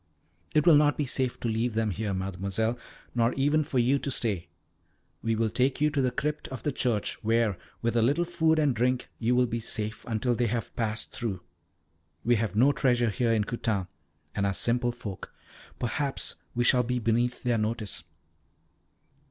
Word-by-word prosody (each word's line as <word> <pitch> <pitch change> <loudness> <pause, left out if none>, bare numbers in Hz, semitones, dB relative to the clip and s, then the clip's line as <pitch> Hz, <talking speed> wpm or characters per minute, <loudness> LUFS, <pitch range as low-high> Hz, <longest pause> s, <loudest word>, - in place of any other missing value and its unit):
"It 150 - +4
will 165 -4 +8
not 145 0 +3
be 150 - 0
safe 130 -1 -1
to - - -1
leave 115 +1 0
them 110 -1 +1
here, 105 +2 -2
Mademoiselle, 95 +4 -1 0.4
nor 120 0 +2
even 145 +3 +2
for 135 - -3
you 125 +3 +3
to 140 - -3
stay. 105 -10 0 0.7
We 115 0 0
will 110 -1 0
take 130 +1 +1
you 150 +1 +3
to 145 -2 +1
the 130 - +2
crypt 150 +4 -2
of 130 -4 -7
the 145 - 0
church, 120 -6 -1
where, 115 -2 +2 0.3
with 115 0 +1
a 115 - +4
little 145 +9 +2
food 160 -2 +2
and 145 -5 +2
drink, 125 +2 0
you 120 +2 +2
will 125 0 +4
be 115 -1 -2
safe 110 -1 -3
until 120 +2 0
they 120 0 +1
have 115 0 -3
passed 110 -1 -2
through. 100 -7 -3 0.8
We 120 0 +3
have 110 -2 -2
no 130 +6 +5
treasure 120 -5 +2
here 120 +1 +1
in 110 -2 +3
Coutane, 105 -4 -2 0.4
and 100 - 0
are 100 - -1
simple 120 +1 +1
folk. 105 -6 -8 0.4
Perhaps 135 +3 -2 0.2
we 120 - +2
shall 125 +1 +5
be 125 +1 -1
beneath 120 +2 0
their 120 -2 +2
notice." 110 -6 -2
120 Hz, 185 wpm, -28 LUFS, 110-130 Hz, 0.8 s, will